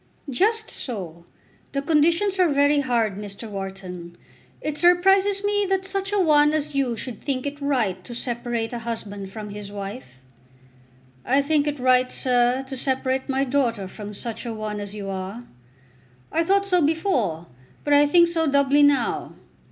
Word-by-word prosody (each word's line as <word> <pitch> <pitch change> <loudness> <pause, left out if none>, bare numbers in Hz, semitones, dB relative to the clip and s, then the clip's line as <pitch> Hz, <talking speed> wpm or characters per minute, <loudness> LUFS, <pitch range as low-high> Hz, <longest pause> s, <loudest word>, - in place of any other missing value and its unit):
"Just 440 - +1
so. 175 - -6 0.5
The 275 - 0
conditions 335 +6 +2
are 365 - +5
very 285 +1 +3
hard, 230 -7 0
Mr. 205 +2 -8
Wharton. 190 -3 -7 0.4
It 300 -1 -4
surprises 385 +3 +4
me 410 0 +2
that 385 0 0
such 390 +1 -3
a 415 - +1
one 300 -4 +4
as 300 -1 -1
you 265 -4 0
should 240 -1 -6
think 265 -2 -2
it 285 0 -5
right 230 -10 0
to 240 - -8
separate 240 -2 -3
a 240 - -3
husband 205 -4 -6
from 210 0 -7
his 205 0 -8
wife." 200 - -8 1.0
"I 270 +3 +2
think 295 0 +1
it 295 -1 -2
right, 255 0 +3
sir, 250 0 +1
to 265 - -6
separate 260 +1 -1
my 270 0 +1
daughter 245 -7 0
from 210 +2 -8
such 230 +2 -5
a 235 -2 -5
one 215 -1 -4
as 205 0 -6
you 200 -2 -6
are. 195 +4 -5 0.9
I 330 - +2
thought 395 +2 +3
so 365 -3 +2
before, 285 - 0 0.4
but 290 - +1
I 290 0 +6
think 340 +3 +5
so 330 -1 0
doubly 280 0 +3
now. 285 -4 +2
260 Hz, 165 wpm, -23 LUFS, 210-300 Hz, 1.0 s, I